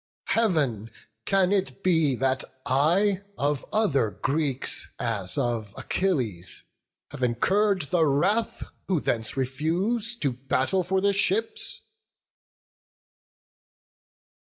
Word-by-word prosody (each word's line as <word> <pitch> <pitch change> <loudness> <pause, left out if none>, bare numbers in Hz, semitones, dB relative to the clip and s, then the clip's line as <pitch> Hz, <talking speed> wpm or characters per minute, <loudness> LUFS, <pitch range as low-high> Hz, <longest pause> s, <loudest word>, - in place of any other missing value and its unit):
Heav'n! 145 - +1 0.4
can 195 -1 +3
it 195 0 -1
be 160 -7 +3
that 130 +1 0 0.2
I 175 +9 +2 0.2
of 145 -1 0
other 140 - +2
Greeks, 135 +3 -1
As 105 -4 0
of 120 -5 -2
Achilles, 125 - -1 0.5
have - - -8
incurr'd 190 - +2
the 165 -3 +3
wrath, 195 +11 +1 0.2
Who 185 -4 +1
thence 115 -2 -2
refuse 175 - 0
to 135 - +1
battle 135 +8 0
for 190 +2 0
the 200 0 +2
ships?" 200 +3 +1
155 Hz, 100 wpm, -26 LUFS, 130-195 Hz, 0.5 s, can